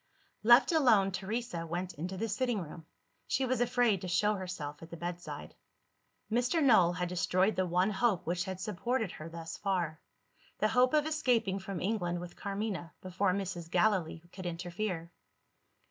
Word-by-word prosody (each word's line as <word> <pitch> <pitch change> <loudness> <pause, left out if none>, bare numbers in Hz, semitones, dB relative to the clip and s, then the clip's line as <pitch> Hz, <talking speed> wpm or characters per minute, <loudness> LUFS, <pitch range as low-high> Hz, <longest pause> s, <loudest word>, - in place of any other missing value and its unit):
Left 240 +8 +7
alone, 235 - +4
Teresa 190 -2 -3
went 175 +2 -3
into 180 +5 -5
the 225 +4 -1
sitting 230 +1 0
room: 165 -1 -8 0.4
she 270 - +1
was 255 -1 0
afraid 245 -5 +2
to 185 - -5
show 195 +4 +2
herself 180 -7 -5
at 165 - -10
the 170 - -8
bedside. 175 +1 -6 0.8
Mr. 250 +8 +2
Null 190 -10 +6
had 180 0 -2
destroyed 185 +3 +1
the 185 -1 +1
one 180 +4 +2
hope 200 -2 +1
which 175 +2 -1
had 190 -1 -5
supported 215 +2 -1
her 155 +2 -8
thus 165 0 -7
far 175 -6 -1 0.6
the 215 - +2
hope 255 +4 +4
of 300 -1 +3
escaping 245 -11 +1
from 190 -1 -5
England 175 -4 -1
with 175 0 -8
Carmina, 200 -4 -4
before 185 +1 0
Mrs. 180 -3 -3
Gallilee 175 -5 +1
could 185 -2 -6
interfere. 175 0 -4
190 Hz, 160 wpm, -32 LUFS, 175-220 Hz, 0.8 s, Left